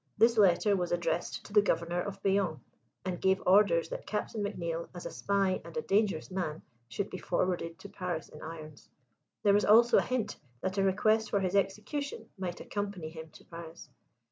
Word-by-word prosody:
This 230 Hz, +2 st, +5 dB
letter 200 Hz, 0 st, +4 dB
was 180 Hz, -2 st, -1 dB
addressed 175 Hz, -1 st, -1 dB
to 205 Hz, -, -11 dB
the 210 Hz, -, +7 dB
Governor 170 Hz, -2 st, 0 dB
of 195 Hz, +1 st, -6 dB
Bayonne, 190 Hz, -6 st, +1 dB, 0.5 s
and 180 Hz, -2 st, -3 dB
gave 190 Hz, 0 st, +3 dB
orders 180 Hz, -4 st, +5 dB
that -, -, -6 dB
Captain 210 Hz, 0 st, -2 dB
McNeill, 170 Hz, -5 st, -3 dB
as 175 Hz, -, -7 dB
a -, -, -4 dB
spy 195 Hz, -2 st, 0 dB
and -, -, -9 dB
a 470 Hz, -, -1 dB
dangerous 200 Hz, -, +1 dB
man, 175 Hz, -4 st, -3 dB, 0.2 s
should 200 Hz, +12 st, -3 dB
be 185 Hz, -, -5 dB
forwarded 175 Hz, -2 st, -1 dB
to -, -, -10 dB
Paris 180 Hz, -5 st, -4 dB
in 150 Hz, -, -13 dB
irons. 155 Hz, -2 st, -9 dB, 0.5 s
There 200 Hz, -, +5 dB
was 205 Hz, -, +4 dB
also 235 Hz, +3 st, +6 dB
a -, -, +3 dB
hint 255 Hz, -4 st, -2 dB, 0.2 s
that 190 Hz, +1 st, -1 dB
a -, -, +3 dB
request 215 Hz, +3 st, +2 dB
for 200 Hz, -, +2 dB
his 185 Hz, 0 st, 0 dB
execution 210 Hz, +9 st, -1 dB
might 180 Hz, -2 st, -4 dB
accompany 200 Hz, -6 st, -4 dB
him 160 Hz, 0 st, -9 dB
to -, -, -17 dB
Paris. 165 Hz, 0 st, -10 dB
190 Hz, 190 wpm, -31 LUFS, 170-205 Hz, 0.5 s, the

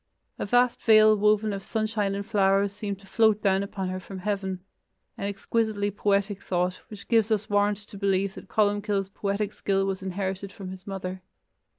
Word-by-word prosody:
A -, -, -2 dB
vast 245 Hz, +2 st, +3 dB
veil 215 Hz, -1 st, +6 dB
woven 210 Hz, 0 st, +2 dB
of 195 Hz, -1 st, -5 dB
sunshine 215 Hz, -3 st, -1 dB
and 200 Hz, 0 st, -4 dB
flowers 200 Hz, -2 st, +2 dB
seemed 205 Hz, -1 st, -4 dB
to -, -, -16 dB
float 220 Hz, +1 st, +3 dB
down 195 Hz, -2 st, +2 dB
upon 195 Hz, -1 st, -4 dB
her 185 Hz, 0 st, -3 dB
from 190 Hz, +1 st, -9 dB
heaven: 190 Hz, -1 st, -2 dB, 0.5 s
an 200 Hz, -, -3 dB
exquisitely 205 Hz, 0 st, -1 dB
poetic 200 Hz, 0 st, 0 dB
thought, 180 Hz, 0 st, -1 dB
which 210 Hz, -2 st, -11 dB
gives 225 Hz, -2 st, +3 dB
us 210 Hz, -1 st, 0 dB
warrant 205 Hz, 0 st, +3 dB
to 205 Hz, 0 st, -12 dB
believe 195 Hz, -1 st, +1 dB
that -, -, -11 dB
Columcille's 205 Hz, -2 st, +1 dB
poetic 200 Hz, +1 st, -2 dB
skill 195 Hz, -1 st, 0 dB
was 195 Hz, 0 st, -2 dB
inherited 190 Hz, +1 st, -3 dB
from 190 Hz, -1 st, -8 dB
his 185 Hz, 0 st, -10 dB
mother. 190 Hz, -1 st, -5 dB
200 Hz, 180 wpm, -26 LUFS, 195-210 Hz, 0.5 s, veil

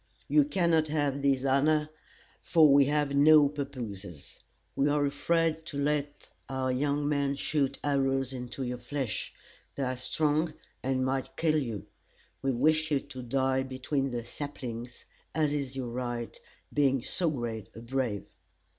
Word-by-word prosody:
You 300 Hz, -2 st, +5 dB
cannot 170 Hz, -, +2 dB
have 145 Hz, -2 st, 0 dB
this 135 Hz, -1 st, +2 dB
honor, 150 Hz, +3 st, +3 dB, 0.5 s
for 160 Hz, -3 st, +5 dB
we 140 Hz, 0 st, +7 dB
have 145 Hz, 0 st, +1 dB
no 150 Hz, +1 st, +7 dB
pappooses. 115 Hz, -, -7 dB, 0.4 s
We 140 Hz, +2 st, +2 dB
are 145 Hz, 0 st, +2 dB
afraid 160 Hz, +3 st, +1 dB
to 145 Hz, -, -5 dB
let 145 Hz, 0 st, -1 dB, 0.2 s
our 130 Hz, -1 st, -1 dB
young 145 Hz, +2 st, 0 dB
men 140 Hz, -1 st, +1 dB
shoot 140 Hz, -1 st, 0 dB
arrows 135 Hz, -2 st, +1 dB
into 125 Hz, +1 st, -5 dB
your 125 Hz, -1 st, -3 dB
flesh. 125 Hz, -2 st, -3 dB, 0.4 s
They 140 Hz, -, -2 dB
are 130 Hz, 0 st, -1 dB
strong, 150 Hz, +4 st, 0 dB, 0.3 s
and 130 Hz, 0 st, 0 dB
might 130 Hz, 0 st, -2 dB
kill 155 Hz, -2 st, +3 dB
you. 115 Hz, -7 st, -4 dB, 0.6 s
We 135 Hz, -, +1 dB
wish 155 Hz, +5 st, +2 dB
you 145 Hz, -2 st, +2 dB
to 135 Hz, -2 st, -9 dB
die 130 Hz, +2 st, +1 dB
between 135 Hz, +1 st, -2 dB
the 120 Hz, -2 st, -4 dB
saplings, 125 Hz, -5 st, -7 dB, 0.3 s
as 155 Hz, -2 st, +2 dB
is 140 Hz, -3 st, -3 dB
your 130 Hz, -3 st, -3 dB
right, 120 Hz, -1 st, -4 dB, 0.4 s
being 135 Hz, -4 st, +2 dB
so 175 Hz, +3 st, 0 dB
great 120 Hz, -7 st, -4 dB
a -, -, -8 dB
brave. 120 Hz, -4 st, -2 dB
140 Hz, 150 wpm, -29 LUFS, 130-150 Hz, 0.6 s, we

